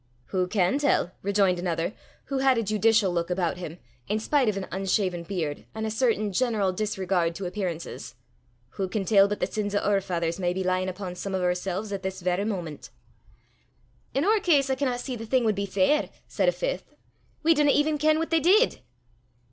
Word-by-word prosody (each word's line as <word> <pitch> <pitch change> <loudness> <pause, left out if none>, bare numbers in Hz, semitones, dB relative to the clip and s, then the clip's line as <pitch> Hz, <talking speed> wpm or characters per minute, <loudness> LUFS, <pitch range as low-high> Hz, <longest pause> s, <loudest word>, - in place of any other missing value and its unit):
"Wha 185 -1 +1
can 190 +6 +1
tell," 280 -10 +2
rejoined 195 -2 +2
another, 175 +1 -1 0.3
who 275 -1 -2
had 265 -2 +4
a 230 - +1
judicial 215 -1 +3
look 170 0 -1
about 180 -1 0
him, 175 -2 -7 0.3
in 210 - 0
spite 260 +1 +2
of 205 - -2
an 195 - -3
unshaven 190 -1 0
beard, 165 -5 -4
and 220 0 -3
a 220 - -2
certain 220 -3 +1
general 215 -3 +1
disregard 190 -4 -1
to 195 - -5
appearances, 175 -3 -5 0.6
"wha 190 - 0
can 195 +1 -2
tell 200 -1 +5
but 205 +1 -3
the - - +1
sins 205 +1 -3
o' - - +4
oor 200 -1 +3
faithers 170 -2 -2
may 175 -1 0
be 190 +1 -2
lyin' 185 0 0
upo' 185 -1 -6
some 190 +2 -4
o' - - 0
oorsel's 180 +3 -1
at 195 - -3
this 190 0 -4
varra 180 +3 0
moment?" 175 -8 -5 1.3
"In 275 +4 +2
oor 430 +2 +4
case, 285 -8 +3
I - - +4
canna 260 -3 -1
see 250 +1 -4
the 225 -1 -7
thing 255 +1 +2
wad 220 -2 +2
be 200 0 -3
fair," 195 +10 +2 0.2
said - - +2
a - - +3
fifth: - - -4 0.5
"we 330 +1 +6
dinna 295 -2 +3
even 295 +1 +2
ken 310 +1 +3
what 325 +1 -2
they 330 - +4
did!" 405 +9 +4
200 Hz, 205 wpm, -26 LUFS, 180-245 Hz, 1.3 s, we